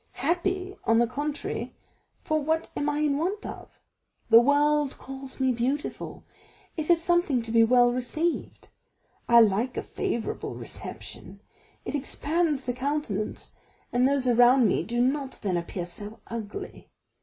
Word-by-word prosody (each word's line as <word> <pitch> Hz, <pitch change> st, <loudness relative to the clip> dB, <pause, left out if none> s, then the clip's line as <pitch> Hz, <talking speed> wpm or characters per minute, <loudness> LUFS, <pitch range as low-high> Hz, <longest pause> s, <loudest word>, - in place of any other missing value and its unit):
Happy, 365 Hz, +6 st, -1 dB
on 225 Hz, -, +4 dB
the 240 Hz, -, +5 dB
contrary, 290 Hz, +5 st, -4 dB, 0.5 s
for 310 Hz, 0 st, +1 dB
what 320 Hz, +3 st, -1 dB
am 290 Hz, -, 0 dB
I 295 Hz, -, -1 dB
in 290 Hz, -2 st, +1 dB
want 390 Hz, +6 st, -2 dB
of? -, -, -9 dB, 0.5 s
The 230 Hz, -, +10 dB
world 290 Hz, +2 st, +2 dB
calls 270 Hz, 0 st, -9 dB
me 260 Hz, -1 st, +3 dB
beautiful. 255 Hz, +5 st, -3 dB, 0.5 s
It 315 Hz, -1 st, -4 dB
is 340 Hz, -1 st, +6 dB
something 345 Hz, -7 st, +2 dB
to 225 Hz, -, -6 dB
be 230 Hz, 0 st, +6 dB
well 245 Hz, +1 st, +5 dB
received. 310 Hz, +7 st, -2 dB, 0.6 s
I 235 Hz, 0 st, +8 dB
like 225 Hz, +4 st, +2 dB
a -, -, -2 dB
favorable 230 Hz, -1 st, -3 dB
reception; -, -, -8 dB, 0.5 s
it -, -, -4 dB
expands 295 Hz, +1 st, 0 dB
the 245 Hz, -, -2 dB
countenance, 255 Hz, -6 st, -3 dB, 0.4 s
and 250 Hz, +1 st, +4 dB
those 275 Hz, -2 st, +1 dB
around 245 Hz, 0 st, +6 dB
me -, -, +1 dB
do 240 Hz, +1 st, -1 dB
not 270 Hz, +1 st, 0 dB
then 190 Hz, -3 st, 0 dB
appear 175 Hz, +1 st, -3 dB
so 205 Hz, +5 st, -9 dB
ugly. 220 Hz, -3 st, -7 dB
265 Hz, 145 wpm, -27 LUFS, 235-300 Hz, 0.6 s, The